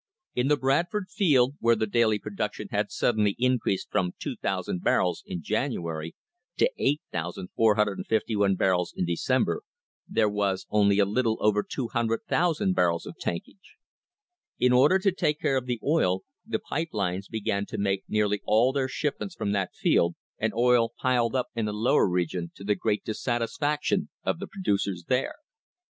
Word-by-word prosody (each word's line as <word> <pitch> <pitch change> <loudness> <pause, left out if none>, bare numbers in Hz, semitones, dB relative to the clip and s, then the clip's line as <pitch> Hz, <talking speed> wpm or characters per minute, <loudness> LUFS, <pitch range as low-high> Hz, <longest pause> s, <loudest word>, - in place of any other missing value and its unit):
In 125 +2 +1
the 150 0 +3
Bradford 175 +9 0
field, 145 - +3
where 115 0 +4
the 110 - 0
daily 110 0 +2
production 105 0 -4
had 105 0 0
suddenly 105 -4 +1
increased 125 -6 0
from 90 -1 0
2,000 95 -2 -3
barrels 90 -2 +1
in 85 - -5
January 80 0 -2 0.4
to 480 - +3
8,451 105 - 0
barrels 90 -2 +1
in 90 - 0
December, 130 - 0 0.5
there 110 - +2
was 100 -2 -1
only 100 -1 +4
a 100 - +5
little 110 +2 +1
over 105 -1 +3
200,000 120 - 0
barrels 85 -2 +1
of - - -8
tankage.* 90 - -6 0.8
In 125 0 +3
order 145 +9 +6
to 190 +1 +2
take 150 -4 0
care 135 - +1
of 130 -1 -1
the 120 -2 -2
oil 95 - +2 0.2
the - - -2
pipe 160 +2 -3
lines 95 -2 -2
began 100 -2 -2
to - - -6
make 100 -1 0
nearly 105 -1 +1
all 115 +5 +3
their 135 -2 0
shipments 155 +7 -3
from 100 - -2
that 100 -2 -1
field, 85 0 +2 0.2
and 110 0 0
oil 120 -1 +3
piled 125 -1 +1
up 130 - 0
in 115 -2 -1
the 105 - -2
Lower 105 -2 +3
Region 90 -1 -1
to - - -11
the 105 +1 +2
great 105 +1 -1
dissatisfaction 125 +7 -1
of - - -1
the - - -5
producers 100 - -1
there. 125 0 0
110 Hz, 155 wpm, -27 LUFS, 100-130 Hz, 0.8 s, order